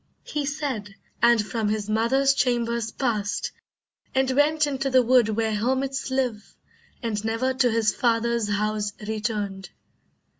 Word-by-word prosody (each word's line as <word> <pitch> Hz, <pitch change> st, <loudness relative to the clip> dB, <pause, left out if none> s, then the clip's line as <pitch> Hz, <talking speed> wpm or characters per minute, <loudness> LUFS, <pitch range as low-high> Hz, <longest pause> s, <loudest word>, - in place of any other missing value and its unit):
He 290 Hz, -2 st, -3 dB
said, 265 Hz, -9 st, -4 dB, 0.3 s
and 235 Hz, -3 st, +5 dB
from 210 Hz, +1 st, -1 dB
his 210 Hz, -1 st, -2 dB
mother's 245 Hz, +6 st, +3 dB
chambers 235 Hz, -3 st, 0 dB
past, 215 Hz, -4 st, -2 dB, 0.6 s
And 265 Hz, 0 st, +2 dB
went 300 Hz, +3 st, +3 dB
into 275 Hz, -1 st, -2 dB
the 255 Hz, -1 st, +5 dB
wood 245 Hz, -2 st, +4 dB
where 220 Hz, 0 st, 0 dB
hermits 265 Hz, +5 st, -1 dB
live, 250 Hz, -5 st, -2 dB, 0.5 s
And 215 Hz, -3 st, -2 dB
never 225 Hz, +4 st, 0 dB
to 255 Hz, -1 st, +2 dB
his 225 Hz, -2 st, +2 dB
father's 235 Hz, -2 st, +1 dB
house 210 Hz, 0 st, -1 dB
returned. 210 Hz, -3 st, -3 dB
235 Hz, 135 wpm, -25 LUFS, 215-260 Hz, 0.6 s, and